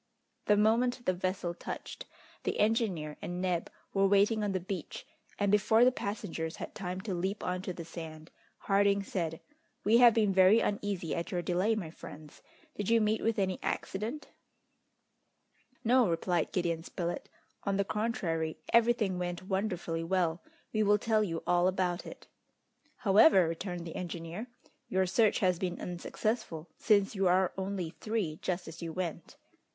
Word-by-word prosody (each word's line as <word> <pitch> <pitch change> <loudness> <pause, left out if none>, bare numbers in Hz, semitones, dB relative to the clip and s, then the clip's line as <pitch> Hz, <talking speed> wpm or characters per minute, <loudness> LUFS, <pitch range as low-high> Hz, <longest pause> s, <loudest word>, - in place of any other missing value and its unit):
The 210 - +5
moment 240 +4 +2
the 185 - +2
vessel 185 -1 -2
touched, - - -7 0.3
the - - -2
engineer 205 -9 +1
and 175 0 -4
Neb 180 -2 -1 0.2
were 195 0 +4
waiting 205 +2 +3
on 205 - 0
the 190 - 0
beach, 185 -1 -6 0.3
and 200 -1 +1
before 220 +3 +5
the 255 - +6
passengers 200 -8 -4
had - - -7
time 185 -2 -4
to 200 -1 -4
leap 190 +4 -2
on 180 0 -2
to 185 - -4
the 170 -2 -7
sand, 160 -1 -9 0.3
Harding 200 0 +3
said: 165 -5 -3 0.4
"We 225 +3 +5
have 240 -2 +7
been 210 -3 +3
very 190 +4 +6
uneasy 200 -6 -2
at 170 - -3
your 175 -1 -2
delay, 185 +6 +1
my 175 -7 -4
friends! 155 -2 -12 0.3
Did 205 0 -3
you 230 0 +5
meet 215 0 +1
with 225 0 0
any 190 -2 0
accident?" 225 +10 -3 1.5
"No," 245 -2 +4
replied 170 0 0
Gideon 170 -3 -1
Spilett; 175 -1 -4 0.3
"on 200 -1 0
the 200 - +1
contrary, 185 -8 -1 0.2
everything 230 -5 +3
went 175 0 -3
wonderfully 185 -4 -2
well. 170 -1 0 0.3
We 215 - +2
will 210 0 +4
tell 215 0 +2
you 165 -5 -3
all 175 0 +3
about 185 -2 -1
it." - - -10 0.7
"However," 200 - +6
returned 175 +1 -4
the 165 - -7
engineer, 175 +5 -5 0.4
"your 190 0 +2
search 210 +4 +2
has 180 -3 +2
been 180 -2 -2
unsuccessful, 175 -2 -3
since 200 -3 +3
you 195 -2 +1
are 185 +1 +3
only 190 -3 -3
three 205 -8 -3
just 180 -1 -2
as 160 0 -9
you 165 -1 -4
went!" 175 - -5
190 Hz, 160 wpm, -31 LUFS, 175-210 Hz, 1.5 s, have